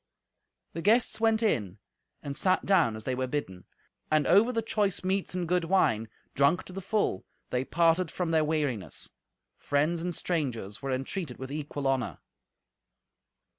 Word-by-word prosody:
The 165 - -4
guests 225 +6 +3
went 225 0 +2
in 105 - 0 0.5
and 140 -1 -4
sat 185 +4 +2
down 175 - +3
as 110 - -8
they 130 - -2
were 130 0 -1
bidden, 125 -10 -4 0.4
and 155 -2 +3
over 205 +8 +5
the 230 -2 -1
choice 205 -4 0
meats 190 0 -1
and 180 -2 -2
good 180 0 +1
wine, 115 - +2 0.2
drunk 140 +6 +3
to 185 - -11
the 195 - -5
full, 195 - 0 0.3
they 125 0 +1
parted 165 +3 +2
from 175 0 -2
their 160 -1 +3
weariness. 145 -9 -2 0.5
Friends 150 +4 0
and 175 0 -2
strangers 125 - -2
were 135 -1 -3
entreated 135 +2 -3
with 130 +1 -7
equal 145 -1 -4
honour. 135 -2 0
160 Hz, 160 wpm, -29 LUFS, 130-185 Hz, 0.5 s, over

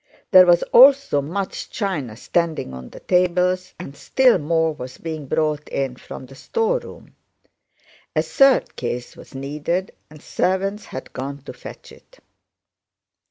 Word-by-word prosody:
There 185 -2 +8
was 175 0 +5
also 270 - +6
much 185 +7 -4
china 150 - -3
standing 160 - -2
on 65 -1 -9
the - - -13
tables, 180 +1 +1
and 140 -6 -9
still 255 - +3
more 160 +1 +1
was 130 -3 -9
being 155 -3 -6
brought 150 0 -1
in 135 -2 -2
from 130 - -10
the 130 - -15
storeroom. 455 - -3 1.0
A - - +2
third 275 -1 +3
case 120 0 -5
was - - -14
needed 150 +7 -3 0.2
and 155 0 -14
servants 195 +6 -1
had 130 - -9
gone 140 +1 -6
to - - -9
fetch - - -12
it. - - -19
165 Hz, 140 wpm, -21 LUFS, 140-190 Hz, 1.0 s, There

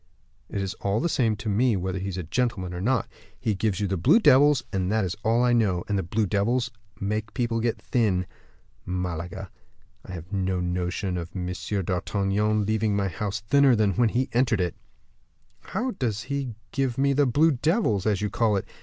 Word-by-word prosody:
"It's 95 -1 -3
all 100 +2 +1
the 170 - +1
same 115 -9 +1
to 100 +2 -7
me 110 +3 +2
whether 95 +1 -2
he's 95 0 -4
a 90 - -3
gentleman 95 0 -1
or 90 - -5
not. 120 +2 +1 0.3
He 110 - 0
gives 100 -1 -1
you 105 - 0
the 95 0 -1
blue 90 - +5
devils, 145 - +5
that 95 +2 0
is 90 +1 -3
all 115 +2 +3
I 125 -1 +3
know. 100 -7 +2
And 105 - 0
the 95 - +1
blue 105 +6 0
devils 110 +4 0 0.3
make 105 +2 -3
people 120 -3 0
get 115 0 -1
thin. 100 -7 +1 0.6
Malaga! 90 0 -4 0.5
I 95 - -9
have 90 +2 -8
no 95 -1 0
notion 90 +1 -2
of 85 -1 -5
M. 90 -1 -3 0.3
d'Artagnan 100 +3 0
leaving 110 0 +1
my 100 -1 0
house 100 +3 -3
thinner 135 +5 +4
than 105 -2 +2
when 120 +1 +3
he 125 +4 0
entered 120 -3 +2
it." 90 -3 0 0.9
"How 255 +3 -3
does 115 - -2
he 140 -5 -3 0.2
give 135 -3 -1
me 140 +1 +3
the 140 0 +3
blue 150 +6 +4
devils, 135 - +1
as 105 -1 +1
you 105 - -1
call 110 -3 +2
it? 95 - -3
105 Hz, 190 wpm, -26 LUFS, 95-120 Hz, 0.9 s, blue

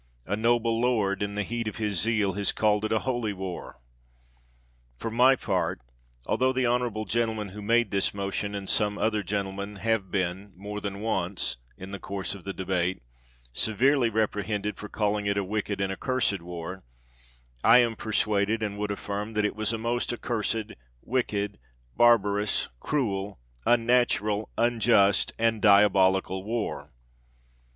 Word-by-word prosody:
A 100 - -1
noble 115 +1 +2
lord, 105 -6 +1
in 100 0 -2
the 105 - 0
heat 115 +2 -3
of 105 - -4
his 105 -5 -1
zeal, 110 -4 +1
has 100 +1 0
called 105 -1 +2
it 110 - -1
a 110 - +2
holy 120 -5 -1
war. 95 -2 -7 1.2
For 115 - -4
my 125 +4 +5
part, - - -1 0.5
altho 130 +1 +2
the 130 -1 0
honorable 120 -3 0
gentleman 110 -3 -1
who 105 +3 -9
made 115 +1 +2
this 100 -1 +1
motion, 100 +1 -3
and 100 -1 -5
some 105 0 +1
other 110 -1 +1
gentlemen, 100 +1 -3
have 110 -2 -1
been, 95 +1 -2
more 105 +2 -6
than 100 0 -5
once, 95 - -1 0.2
in 95 +1 -9
the 100 - -5
course 100 -1 -4
of 100 -3 -11
the 100 - -3
debate, 95 -3 -1 0.5
severely 125 - +2
reprehended 105 -1 -1
for 105 - -8
calling 105 -1 0
it 100 0 +1
a 100 - +1
wicked 100 0 -2
and 95 0 0
accursed 115 -4 0
war, 90 +2 -7 0.8
I 115 +2 +8
am 120 -2 +3
persuaded, 110 0 0
and 105 -1 -3
would 105 0 -2
affirm, 100 +1 -4
that 105 0 +1
it 105 - -1
was 110 0 0
a 115 - -1
most 120 +2 -1
accursed, 115 -2 -2 0.3
wicked, 105 - -1 0.4
barbarous, 105 -3 +3
cruel, 100 - -2 0.3
unnatural, 115 -3 +2
unjust 115 -4 +3
and 115 -1 +1
diabolical 95 -2 +4
war 115 +2 -3
105 Hz, 155 wpm, -27 LUFS, 100-115 Hz, 1.2 s, I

